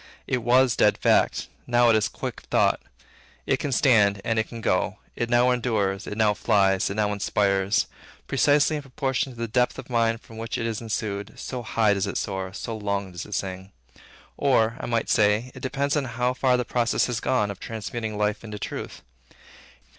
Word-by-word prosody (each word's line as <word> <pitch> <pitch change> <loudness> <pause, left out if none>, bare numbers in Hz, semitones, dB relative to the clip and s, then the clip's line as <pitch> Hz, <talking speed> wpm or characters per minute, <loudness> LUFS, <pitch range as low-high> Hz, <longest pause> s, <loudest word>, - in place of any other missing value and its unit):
It 125 - 0
was 125 +1 +4
dead 105 - +3
fact; - - +2 0.2
now, 120 -1 +4
it - - +4
is 110 -1 +2
quick - - -6
thought. - - +2 0.6
It - - +2
can 145 - -2
stand, 105 -6 +4
and 115 -1 +1
it 110 - -1
can 115 - -7
go. - - 0 0.2
It 120 - -2
now 120 +1 +4
endures, 110 -5 -1
it 105 - -5
now 110 -2 +3
flies, 100 -3 +2
it 100 - -4
now 105 -1 +1
inspires. 100 0 +1 0.4
Precisely 150 +2 +3
in - - -5
proportion 135 0 -2
to 120 - -14
the 115 0 -3
depth 125 +2 +1
of - - -9
mind 115 -1 +1
from 110 0 -12
which 115 0 -3
it 115 - -2
issued, 105 -3 -3
so 125 -2 -5
high 110 -2 +2
does 100 -2 -1
it - - -3
soar, 95 -2 -3
so 110 +3 -5
long 100 -2 -2
does 90 +1 -7
it 105 - -4
sing. 95 0 -5 0.6
Or, 115 -5 +2
I - - -5
might 115 -1 0
say, 110 +3 +2
it 130 - -10
depends 140 +2 -1
on 145 -2 0
how 125 +1 -1
far 130 -1 +2
the 125 - -1
process 120 -1 +1
had 120 -2 -3
gone, 105 -6 +1
of 100 - -9
transmuting 110 0 -5
life 105 +1 0
into 105 -2 -7
truth. 100 - -6
115 Hz, 195 wpm, -25 LUFS, 105-125 Hz, 0.6 s, was